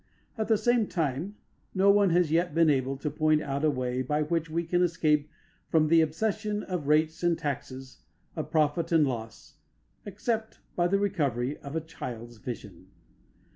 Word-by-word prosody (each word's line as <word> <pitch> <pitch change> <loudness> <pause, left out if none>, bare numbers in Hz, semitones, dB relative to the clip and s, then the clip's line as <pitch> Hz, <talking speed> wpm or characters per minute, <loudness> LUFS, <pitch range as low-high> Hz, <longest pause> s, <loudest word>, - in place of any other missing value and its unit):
At 220 -2 -2
the 220 -1 +4
same 240 -1 +2
time, 160 +5 -2 0.4
no 195 +1 +5
one 200 -1 +4
has 175 -2 +2
yet 170 -1 +1
been 165 -2 +5
able 135 0 0
to 150 +2 -3
point 155 0 +2
out 140 0 -3
a 155 - +4
way 130 -2 -1
by 150 +4 0
which 165 +1 -1
we 165 +2 -1
can 175 +1 0
escape 155 -4 +2 0.4
from 155 -2 +3
the 165 0 +6
obsession 210 +6 -1
of 180 -6 -4
rates 155 +2 +2
and 175 -1 +2
taxes, 130 -2 -5 0.3
of - - -4
profit 155 +2 +1
and 160 -3 +5
loss, 115 -3 -6 0.5
except 220 +2 -3 0.2
by 175 0 +2
the 200 +3 +2
recovery 145 - -1
of 140 - -9
the 160 - -1
child's 120 -7 -8
vision. 120 +1 -8
160 Hz, 175 wpm, -28 LUFS, 140-180 Hz, 0.5 s, the